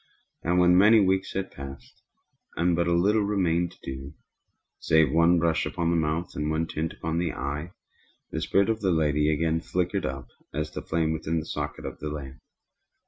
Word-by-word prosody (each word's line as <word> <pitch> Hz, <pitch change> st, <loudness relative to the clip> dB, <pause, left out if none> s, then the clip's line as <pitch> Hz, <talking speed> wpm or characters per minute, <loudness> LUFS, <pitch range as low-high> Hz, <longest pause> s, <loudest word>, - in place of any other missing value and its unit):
And 90 Hz, +2 st, +1 dB
when 90 Hz, 0 st, +5 dB
many 110 Hz, +3 st, +7 dB
weeks 95 Hz, -1 st, +1 dB
had 95 Hz, 0 st, -3 dB
passed, 70 Hz, 0 st, -10 dB, 0.5 s
and 85 Hz, 0 st, +2 dB
but 85 Hz, 0 st, +1 dB
little 95 Hz, +6 st, +3 dB
remained 90 Hz, -4 st, 0 dB
to -, -, -21 dB
do, 65 Hz, +2 st, -7 dB, 0.6 s
save 80 Hz, -3 st, +3 dB
one 85 Hz, +2 st, +4 dB
brush 85 Hz, -1 st, +1 dB
upon 85 Hz, -1 st, -1 dB
the -, -, +2 dB
mouth 80 Hz, +2 st, -1 dB
and 75 Hz, +1 st, -2 dB
one 80 Hz, +1 st, 0 dB
tint 80 Hz, 0 st, -3 dB
upon 80 Hz, -4 st, -3 dB
the 85 Hz, -3 st, -1 dB
eye, 75 Hz, +5 st, -4 dB, 0.6 s
the 80 Hz, -, -3 dB
spirit 100 Hz, +6 st, +2 dB
of 110 Hz, -, -3 dB
the 95 Hz, -, +1 dB
lady 75 Hz, -2 st, +2 dB
again 80 Hz, +1 st, 0 dB
flickered 90 Hz, 0 st, -1 dB
up 65 Hz, -1 st, -5 dB, 0.3 s
as 75 Hz, 0 st, -2 dB
the -, -, -5 dB
flame 80 Hz, -1 st, 0 dB
within 80 Hz, +1 st, -2 dB
the 80 Hz, -, -6 dB
socket -, -, -5 dB
of -, -, -6 dB
the 75 Hz, -, -4 dB
lamp. 70 Hz, -3 st, -7 dB
80 Hz, 190 wpm, -26 LUFS, 75-90 Hz, 0.6 s, many